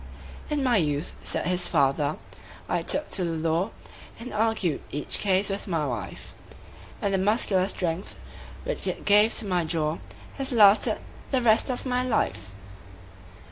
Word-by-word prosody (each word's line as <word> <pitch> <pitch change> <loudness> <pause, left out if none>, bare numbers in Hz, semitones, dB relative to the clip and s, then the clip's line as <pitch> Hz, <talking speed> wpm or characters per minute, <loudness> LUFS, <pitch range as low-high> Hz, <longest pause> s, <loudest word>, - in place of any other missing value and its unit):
"In 295 -2 0
my 245 -4 +3
youth," 150 -3 -1
said - - -2
his 180 0 +1
fater, 145 0 +1 0.5
"I - - 0
took 300 +1 -1
to 185 - -1
the 165 -2 -2
law, 170 +6 0 0.5
And 245 +2 -7
argued 215 -7 0
each 145 - -1
case 195 0 +2
with 195 - -4
my 165 -5 -1
wife; 120 -6 -6 0.7
And 200 - 0
the 190 - +2
muscular 195 -2 +3
strength, 180 -1 -3 0.5
which - - -3
it - - -4
gave 210 +2 +5
to 225 - -2
my 180 -3 0
jaw, 160 -1 -1 0.4
Has 270 0 0
lasted 210 -3 +5 0.3
the 260 -3 +1
rest 225 +3 +4
of 250 +1 -3
my 250 -1 0
life." 215 - -1
195 Hz, 155 wpm, -26 LUFS, 165-225 Hz, 0.7 s, gave